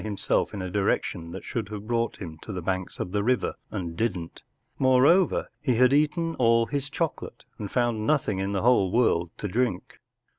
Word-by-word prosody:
himself 105 -2 -1
in 100 -3 -5
a 90 - -5
direction 90 -3 -1
that - - -7
should 110 -4 -4
have 105 -1 -7
brought 115 0 -1
him 85 -5 -7
to - - -7
the 95 -3 -4
banks 95 0 -3
of 90 - -3
the 100 0 0
river 125 +2 +1 0.2
and 85 -5 -5
didn’t. 90 -5 -3 0.4
More¬ 130 0 +5
over, 180 0 +3
he 130 -4 +1
had 125 +3 +4
eaten 160 +3 +1
all 115 -1 +4
his 140 +4 -3
chocolate 165 +2 -4
and 105 - -4
found 120 -2 0
nothing 130 -10 +1
in 95 +1 -1
the 100 -2 -1
w'hole 115 -7 +3
world 95 -8 +2
to 105 - -4
drink. 115 -2 -2
110 Hz, 195 wpm, -26 LUFS, 95-125 Hz, 0.4 s, More¬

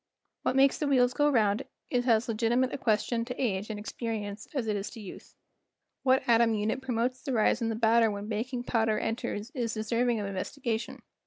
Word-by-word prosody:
What - - 0
makes 270 0 +4
the 300 - 0
wheels 255 -2 +3
go 295 0 +3
round 220 -4 +2 0.3
is 245 0 +1
as 225 -1 +4
legiti¬ 230 +1 0
mate 260 0 +1
a - - -2
question 230 0 +1
to 250 +1 -6
age 205 -5 -1
and 215 - -4
experience 215 -1 -5
as 260 -4 0
it 215 -1 0
is 200 0 -3
to - - -11
youth. 200 -4 -11 0.7
What 260 0 +2
atom 230 -1 +4
unit 215 +5 -1
promotes 250 0 -1
the 275 -3 -3
rise 225 +1 +2
in 230 - 0
the 225 - -1
batter 225 0 +4
when 205 0 -5
baking 240 +3 -3
powder 225 -3 +1
en¬ 225 - -1
ters 220 +1 -5
is 240 -6 -2
deserving 230 +2 0
of 205 - -3
investigation. 220 +4 -4
230 Hz, 210 wpm, -29 LUFS, 215-250 Hz, 0.7 s, makes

